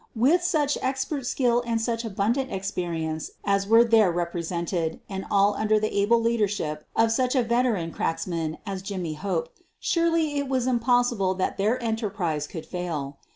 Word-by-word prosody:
With 280 +11 +4
such 305 -5 +1
ex 265 0 -1
pert 275 -5 -4
skill 245 -2 +2
and 230 -1 -1
such 230 0 -1
abundant 225 +5 -1
experience 170 -5 -3 0.2
as 200 -1 +1
were 225 +2 +7
there 225 -5 +4
represented 170 -1 -2
and 195 -1 -5
all 200 +1 +4
under 215 +1 +2
the 215 0 -2
able 205 +4 +4
leadership 205 -9 -1
of 225 0 +3
such 255 +3 +1
a 255 - +3
veteran 230 -8 +1
cracksman 165 -1 -2
as 195 -2 -4
Jimmy 185 -5 -4
Hope, 200 - -2 0.3
surely 330 -3 +1
it 280 -1 -3
was 260 -2 +1
impossible 240 -5 +2
that 185 - -1
their 215 +6 +1
enterprise 200 -10 -2
could 160 0 -7
fail. 155 -6 -4
210 Hz, 160 wpm, -25 LUFS, 180-245 Hz, 0.3 s, were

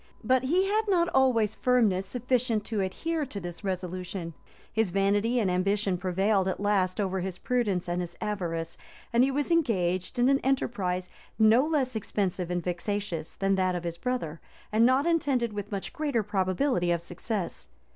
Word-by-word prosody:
But 260 0 +2
he 360 +8 +3
had 430 +2 +1
not 350 -3 +3
always 235 -5 +3
firmness 215 -7 +2
sufficient 245 -1 0
to 215 -3 -1
adhere 315 - -2
to 205 - -5
this 175 +1 -8
resolution: 185 -2 -4 0.4
his 220 -2 +1
vanity 205 +6 +2
and 195 -5 +1
ambition 195 +1 +1
prevailed 190 +2 +1
at 190 - -2
last 200 -2 +1
over 190 -2 0
his 185 0 -4
prudence 205 -8 0
and 175 +1 -1
his 175 -1 -6
avarice; 170 -5 -3 0.3
and 235 +1 +5
he 265 - +3
was 285 +4 -1
engaged 185 - +1
in 245 +1 +4
an 275 0 +4
enterprise 195 -9 -1 0.3
no 220 +3 +6
less 285 -5 0
expensive 195 -4 -2
and 175 -1 -1
vexatious 180 -1 -3
than 195 0 +1
that 185 -1 +1
of 175 - -3
his 170 0 -4
brother, 170 -11 -3 0.3
and 225 +2 +5
not 260 +3 +3
attended 275 -9 +1
with 205 0 -5
much 195 -2 -4
greater 285 -8 0
probability 190 0 0
of 170 -1 0
success. 180 +2 -4
205 Hz, 170 wpm, -28 LUFS, 185-250 Hz, 0.4 s, no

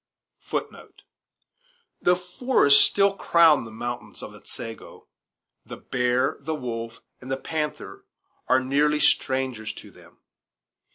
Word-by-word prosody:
Though 180 - +4
forests 180 - +4
still 200 0 +2
crown 165 -8 +4
the - - -9
mountains 120 +2 -6
of - - -9
Otsego, 115 0 -8 0.6
the - - -9
bear, 125 +2 0
the 155 +3 -4
wolf, 115 -4 -6 0.2
and 130 - -10
the 135 - 0
panther 150 +2 -5 0.4
are 130 - +4
nearly 145 +3 +1
strangers 130 -7 +1
to - - -12
them. - - -19
135 Hz, 110 wpm, -24 LUFS, 125-155 Hz, 0.6 s, Though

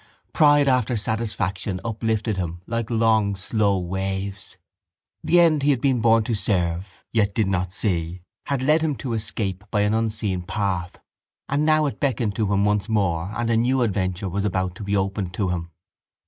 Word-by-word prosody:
Pride 145 -2 +5
after 125 -2 +2
satisfaction 100 -4 -2
uplifted 110 -1 -1
him 85 -1 -4
like 115 -1 -3
long 110 -3 +2
slow 100 0 +1
waves. 95 +2 -4 0.7
The 175 - +4
end 160 -4 +4
he 140 - +2
had 135 -4 +3
been 130 -2 +1
born 115 -1 +4
to 115 - -2
serve 95 -2 -2
yet 105 -3 +1
did 110 - +2
not 95 -2 -1
see 90 -2 -2 0.2
had 140 -2 -1
led 155 +4 +3
him 155 -3 0
to 125 -2 -4
escape 105 -3 -2
by 105 - +1
an 105 +1 +2
unseen 110 -4 -1
path 90 -1 -2 0.5
and 145 +3 0
now 155 -1 +4
it 140 - -3
beckoned 120 -6 0
to 105 -3 0
him 100 0 +2
once 105 0 +1
more 95 -4 0
and 115 0 0
a - - +3
new 125 +2 +2
adventure 95 -2 -1
was 100 +2 -2
about 95 -2 -1
to - - -7
be 100 0 0
opened 95 -1 -2
to 95 -2 0
him. 85 -2 -3
105 Hz, 180 wpm, -23 LUFS, 95-115 Hz, 0.7 s, Pride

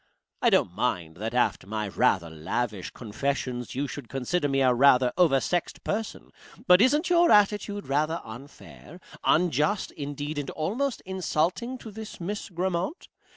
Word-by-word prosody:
I - - +5
don't - - +2
mind 80 -2 -2
that 110 +4 -4
after 120 -6 +1
my 105 0 -3
rather 90 -3 +1
lavish 95 +6 -3
confessions 125 +2 -3
you 140 +2 -1
should 135 -3 -8
consider 145 +4 -1
me 135 0 +1
a 130 -1 +4
rather 125 -1 +5
oversexed 170 0 +1
person, 215 +1 -4 0.3
but 180 +1 +6
isn't 295 +8 +3
your 345 0 +5
attitude 205 0 +3
rather 155 +4 0
unfair, 140 +7 -12 0.2
unjust, 175 +4 +2
indeed, 145 +1 -5
and 140 - -4
almost 230 - -2
insulting, 190 +6 -1
to 225 -3 -10
this 220 +1 -9
Miss 205 +5 -4
Grammont? 180 - -3
150 Hz, 145 wpm, -27 LUFS, 125-195 Hz, 0.3 s, but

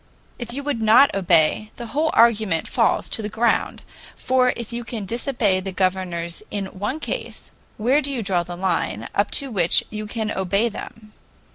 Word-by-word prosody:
If 240 -1 -5
you 280 +3 -5
would 280 -5 -2
not 220 +6 +6
obey, 180 +2 +2
the 240 - -7
whole 310 +3 +1
argument 215 -8 +3
falls 230 -4 +1
to - - -1
the 210 - -4
ground, 230 +2 0 0.3
for 255 -1 +2
if 235 0 -7
you 240 0 -4
can 225 -3 -6
disobey 230 -3 0
the 190 +1 -5
governors 185 -2 -2
in 200 -1 -3
one 250 +10 -2
case, - - -6 0.3
where 255 +7 +3
do 280 0 +2
you 245 -5 -3
draw 185 -3 +1
the 175 0 -7
line 170 - -1
up 205 +1 +1
to 275 -3 -4
which 175 -6 +3
you 215 0 -5
can 220 0 -3
obey 195 +4 0
them? 215 0 -10
215 Hz, 180 wpm, -22 LUFS, 190-240 Hz, 0.3 s, not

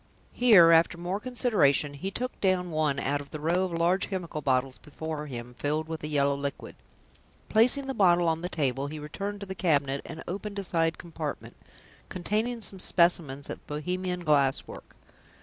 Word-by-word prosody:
Here, 205 -9 +7
after 165 +1 +4
more 175 +3 -3
consideration, 205 - +2
he 150 +7 -4
took 250 +5 -5
down 185 -2 +1
one 155 -3 +1
out 145 +1 -1
of 140 - -12
the 155 - -7
row 170 +5 +1
of 185 - -5
large 170 +3 +2
chemical 175 -6 -4
bottles 130 -1 0
before 150 0 -6
him, 120 -2 -7
filled 155 +2 -1
with 160 -1 -6
a - - -2
yellow 140 -2 +2
liquid; 140 0 -5 0.7
placing 250 +5 +3
the 270 - -3
bottle 175 -5 +4
on 165 0 0
the 180 - -3
table, 140 -4 -1
he 155 +2 -6
returned 200 +8 -5
to - - -5
the 190 - -5
cabinet, 140 -7 +1
and 160 - -8
opened 200 +3 -5
a 200 - -2
side 165 -2 0
compartment, 160 -3 -6 0.5
containing 220 +6 -2
some 195 -2 -6
specimens 170 -7 +1
of - - -8
Bohemian 180 +4 -3
glass 140 -4 +2
work. - - -12
165 Hz, 180 wpm, -28 LUFS, 145-190 Hz, 0.7 s, Here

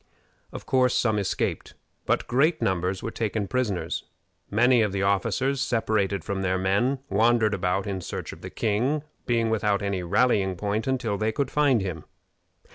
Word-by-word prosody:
Of - - -8
course 125 -1 +2
some 110 -4 +2
escaped, 100 - -2 0.3
but - - +1
great 155 +7 +2
numbers 95 - -1
were 115 - -3
taken 110 -3 -2
prisoners. 115 -7 -2 0.4
Many 120 +3 +4
of 105 -3 0
the 95 0 -1
officers, 115 +7 +1
separated 105 - 0
from 100 -1 -3
their 95 0 0
men, 100 +9 +1
wandered 110 +1 +3
about 95 0 0
in 95 -2 -3
search - - -6
of - - -13
the - - -7
king, 125 +8 0 0.2
being 115 -2 +1
without 105 -2 +1
any 100 -2 -1
rallying 100 0 +2
point 105 +4 -2
until 120 -6 -1
they 110 +1 +1
could 135 +3 -2
find 140 -6 +3
him. 90 -5 -5
110 Hz, 165 wpm, -26 LUFS, 100-125 Hz, 0.4 s, Many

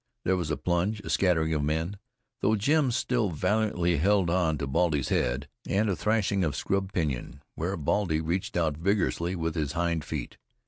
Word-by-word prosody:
There 95 - +2
was 85 -4 -2
a 75 - -1
plunge, 90 +5 0
a - - -5
scattering 80 -4 +2
of 75 -2 0
men, 80 +6 -1 0.4
though 110 -2 +2
Jim 140 +6 +2
still 120 -2 0
valiantly 90 0 +1
held 95 +1 +3
on 85 -4 +2
to 70 - -2
Baldy's 75 -1 +1
head, 65 +4 0 0.2
and 105 +1 +1
a - - 0
thrashing 105 -1 +1
of 75 -4 0
scrub 95 +4 -1
pinyon, 70 -5 -3
where 90 +5 -2
Baldy 80 +1 +1
reached 85 +3 -2
out 80 -4 +1
vigorously 90 -1 0
with 80 -2 -2
his 75 -3 -2
hind 85 -2 0
feet. 75 -6 -5
85 Hz, 180 wpm, -28 LUFS, 80-100 Hz, 0.4 s, held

